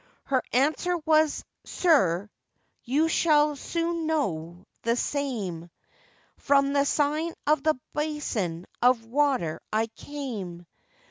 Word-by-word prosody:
Her 260 -2 +1
answer 310 +7 +2
was, 310 -1 +3 0.2
'Sir, 200 - +2 0.6
you 290 +6 +2
shall 300 -2 +3
soon 335 +3 -2
know 175 - -2 0.2
the 230 +1 +1
same, 220 - -3 0.7
From 275 0 +3
the 280 0 +3
sign 300 +3 0
of 300 -1 +3
the 310 -3 +1
basin 240 - -2 0.2
of 245 -2 +4
water 255 - 0
I 220 +1 +2
came. 215 -12 -6
280 Hz, 110 wpm, -27 LUFS, 215-305 Hz, 0.7 s, of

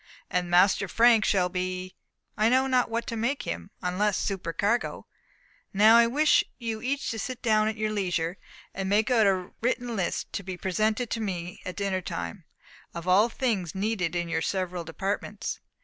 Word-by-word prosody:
"And 180 -1 0
Master 190 +3 +4
Frank 230 +3 +5
shall 185 -2 +2
be 185 0 -4 0.4
I 215 +1 +3
know 260 +2 +4
not 255 -2 +2
what 230 +1 -2
to 230 - -4
make 235 +5 -1
him, 85 0 -5
unless 190 +3 +1
supercargo." 195 +4 -1 0.7
"Now 215 +3 +7
I 235 0 +6
wish 295 +6 +4
you 225 -3 -4
each 275 +3 -2
to 225 - -4
sit 255 +3 -5
down 215 -2 +3
at 220 0 -2
your 215 0 -1
leisure, 180 -4 -1 0.4
and 190 0 -3
make 210 +3 +2
out 225 -4 +5
a 185 -2 0
written 245 0 -1
list, 185 -4 -2
to - - -2
be 185 -1 -6
presented 215 +6 0
to 230 - -1
me 180 -4 -4
at 185 - -5
dinner 195 -2 -1
time, 85 - -6 0.5
of 170 +1 -6
all 200 +6 +5
things 210 -10 -2
needed 190 -4 -1
in 175 -1 -1
your 165 -1 -1
several 185 -1 -2
departments." 195 +5 -4
200 Hz, 180 wpm, -27 LUFS, 180-225 Hz, 0.7 s, Now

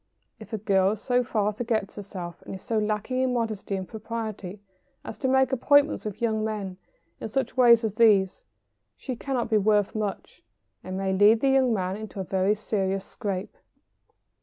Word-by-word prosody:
If - - -12
a 220 - -2
girl 195 -1 +2
so 245 +4 0
far 215 -4 0
forgets 220 -2 -2
herself, 185 -4 -8
and - - -8
is 190 - -11
so 225 -3 0
lacking 215 +4 -1
in 260 -1 +1
modesty 220 -4 -2
and 190 -1 -4
propriety 215 -3 -6 0.4
as - - -7
to 265 - 0
make 265 0 +3
appointments 285 +2 +3
with 215 +2 -5
young 220 -2 +1
men 205 -4 -4 0.4
in - - -4
such 265 +5 -2
ways 240 -2 +6
as 220 -3 -1
these, 205 -4 +3 0.5
she 255 - -5
cannot 250 0 -2
be 215 - +4
worth 205 -1 +2
much, 210 -3 -5 0.4
and 185 0 -5
may 190 0 -1
lead 210 +4 +5
the 275 - +3
young 265 -2 +3
man 190 -2 -1
into 215 -2 -8
a - - -1
very 190 +3 +1
serious 195 -2 -2
scrape. 195 -3 -5
215 Hz, 180 wpm, -26 LUFS, 195-235 Hz, 0.5 s, ways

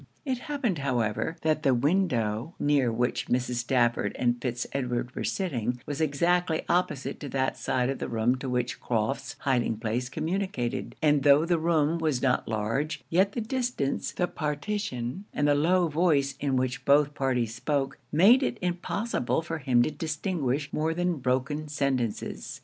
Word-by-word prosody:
It 260 -3 -1
happened, 250 - -1
however, 125 +3 -1
that 155 -1 +2
the 135 -4 +3
window 125 - 0
near 140 -5 +2
which 120 +2 -1
Mrs. 125 0 0
Stafford 120 -3 +1
and 120 -1 +1
Fitz 120 -1 -2
Edward 125 -2 -2
were - - -4
sitting 125 - -1
was 145 +1 -4
exactly 165 +3 +1
opposite 175 -6 0
to 145 - -6
that 130 0 0
side 125 -1 0
of 135 0 -2
the - - -3
room 115 +2 +2
to 130 0 -5
which 125 -1 -1
Crofts' 115 +3 -2
hiding 125 -5 +1
place 115 +3 -2
communicated; 160 -4 -2
and 145 -2 +4
tho' 145 +3 +5
the 170 -1 +1
room 160 0 +2
was 155 -6 +1
not 125 -1 +1
large, 115 +8 -2
yet 190 +4 +3
the 235 - -2
distance, 240 - -1
the 180 - 0
partition, 150 - -3
and 145 - +2
the 145 - +5
low 175 +5 +3
voice 150 -4 +2
in 140 -2 0
which 130 0 -1
both 145 +1 +4
parties 125 -5 0
spoke, 135 +3 -1
made 200 - +6
it - - -1
impossible 180 - -1
for 165 0 -4
him 125 -3 +3
to 155 - -1
distinguish 155 -4 -2
more 160 +1 0
than 175 -1 0
broken 135 +4 -1
sentences. 135 -6 -2
140 Hz, 165 wpm, -27 LUFS, 125-165 Hz, -, made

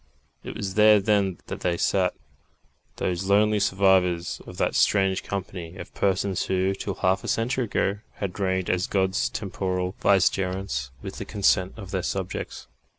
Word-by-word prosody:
It - - -7
was 95 -1 -3
there 105 0 +6
then 100 -3 +1
that - - -6
they 85 -1 0
sat 90 0 +1 0.8
those 90 +1 -2
lonely 105 +2 +3
survivors 95 -3 +2
of - - -10
that - - +1
strange 95 -2 +3
company 90 -3 -5
of - - -9
persons 95 -1 0
who, 95 +1 +1
till 95 0 -4
half 95 0 +1
a - - -6
century 125 +3 0
ago, 100 -1 0 0.2
had 100 -1 -5
reigned 95 -2 0
as 90 0 0
God's 95 0 +1
temporal 95 -2 -2
Vicegerents 95 -6 +1
with - - -6
the - - -5
consent 95 -2 +1
of 100 -4 -9
their 95 - -1
subjects. 95 +1 -4
95 Hz, 155 wpm, -25 LUFS, 90-100 Hz, 0.8 s, there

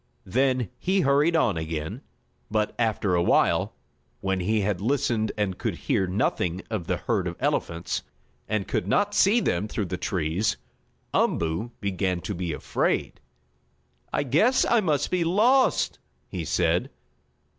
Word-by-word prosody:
Then 130 +1 +1
he 190 +1 +1
hurried 145 +4 +3
on 115 - +2
again, 80 -1 -4 0.5
but, 105 0 0
after 110 -4 +1
awhile, 85 0 +2 0.4
when 95 -1 -1
he 105 +4 +1
had 100 -2 -1
listened 115 -2 +1
and 100 -3 -1
could - - -2
hear 95 - 0
nothing 90 -1 -1
of 100 -7 -3
the - - 0
herd - - -1
of - - -4
elephants, 85 +1 -1 0.5
and 105 -2 -1
could 90 - -1
not 205 - +2
see 205 +3 +4
them 100 - 0
through 105 -1 -2
the 90 0 -4
trees, 90 +3 -1 0.6
Umboo 85 +8 0
began 95 -2 -1
to 105 - -4
be 90 -2 -3
afraid. 75 - -1 0.9
"I - - 0
guess 160 - +3
I 235 - +4
must 155 -8 0
be 180 -2 +2
lost!" 225 +10 +3 0.3
he - - -5
said. - - +1
105 Hz, 145 wpm, -26 LUFS, 90-145 Hz, 0.9 s, see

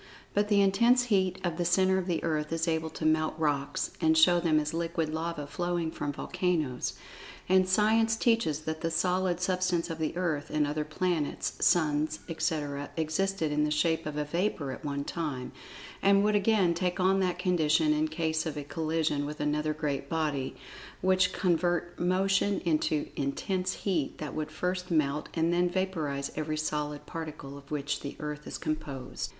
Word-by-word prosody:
But 205 0 +2
the 205 -1 +4
intense 235 +6 +4
heat 190 -2 +2
of 175 -3 -1
the 175 - 0
centre 185 +2 +3
of 185 - -4
the 170 -3 -1
earth 155 -2 -1
is 165 +1 0
able 160 -1 0
to 155 - -6
melt 155 0 +2
rocks, 145 -3 -1
and 160 -1 +4
show 175 +2 +6
them 160 -3 +3
as 150 0 -2
liquid 165 -1 -1
lava 160 -2 -3
flowing 175 +2 -2
from 145 - -3
volcanoes, 165 -4 -1 0.5
and 185 0 +4
Science 220 +3 +3
teaches 225 - +1
that 160 0 -4
the 165 - 0
solid 180 +1 +1
Substance 180 -2 0
of 165 - -5
the 160 +2 -2
Earth, 160 -5 -1
and 155 -1 +1
other 150 +1 -1
planets, 155 0 -1
suns, 155 -2 +2
etc., 145 -4 -2
existed 160 +1 0
in 150 0 +2
the 150 - +1
shape 160 +1 +1
of 150 -1 -4
a 150 - 0
vapor 170 -3 -1
at - - -8
one 140 -1 -2
time, 145 -6 -4 0.5
and 200 0 +5
would 210 0 +3
again 200 -4 +3
take 180 +2 -1
on 190 +1 +3
that 180 -2 0
condition 160 -4 +3
in 155 +1 +1
case 160 0 -1
of 150 - -4
a 145 - -3
collision 155 -1 -1
with 150 +1 -6
another 150 +1 0
great 145 -3 -3
body, 150 -5 -1 0.5
which 185 0 +3
convert 175 -2 0
motion 195 +2 +2
into 155 -3 +1
intense 185 +7 -1
heat 175 -8 -1
that 150 -2 -5
would 155 -1 -3
first 180 0 -2
melt, 150 -3 +1
and 165 +1 +2
then 175 0 +2
vaporize 165 -7 -2
every 155 0 -2
solid 150 -1 -2
particle 155 -4 -7
of 140 0 -13
which 145 -1 -2
the 140 - -6
earth 150 0 -5
is - - -5
composed. 145 -4 -4
160 Hz, 180 wpm, -29 LUFS, 150-180 Hz, 0.5 s, show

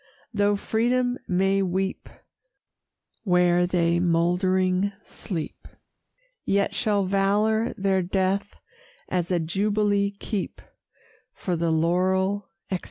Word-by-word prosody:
Though 205 -1 +2
Freedom 245 +4 0
may 195 +2 +2
weep 190 +1 -2 1.1
Where 180 -2 +3
they 170 -1 +2
mouldering 185 +3 +2
sleep, 165 -6 -6 0.8
Yet 200 0 +1
shall 205 -2 +1
valor 210 +4 +1
their 195 -1 +1
death 190 +2 -1 0.5
as 180 -2 -1
a 180 -2 +1
jubilee 200 +4 +1
keep: 200 0 -5 0.7
For 180 - -3
the 165 0 0
laurel, 185 +5 +1 0.2
etc. 185 - 0
190 Hz, 100 wpm, -25 LUFS, 180-205 Hz, 1.1 s, Where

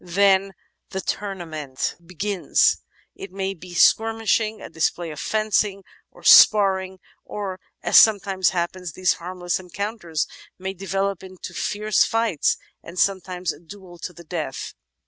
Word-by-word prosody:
Then 195 +2 +3 0.4
the 190 - -4
toumaqient 165 -9 -4
begins. 185 +2 +1 0.4
It 195 - -9
may 195 0 -3
be 180 0 -13
mere 175 - -10
skirmishing, 225 0 +3
a - - -8
display 165 +1 -1
of 150 - -8
fencing, 210 -2 0 0.3
or - - -19
"sparring," 190 -3 +6 0.2
or, 195 -3 -5 0.2
as - - +5
sometimes 200 -4 +5
happens, 180 -1 -3
these 185 +2 +2
harmless 175 0 -3
encounters 185 -3 -3 0.3
may 190 +1 -4
develop 195 +1 -2
into 185 -1 -9
fierce 210 +3 +1
fights 225 -9 +1 0.2
and 170 +2 -11
sometimes 185 -2 0
a - - -15
duel 175 +1 -13
to 180 - -6
the 175 0 -14
death. 155 -5 -5
190 Hz, 135 wpm, -23 LUFS, 175-200 Hz, 0.4 s, sparring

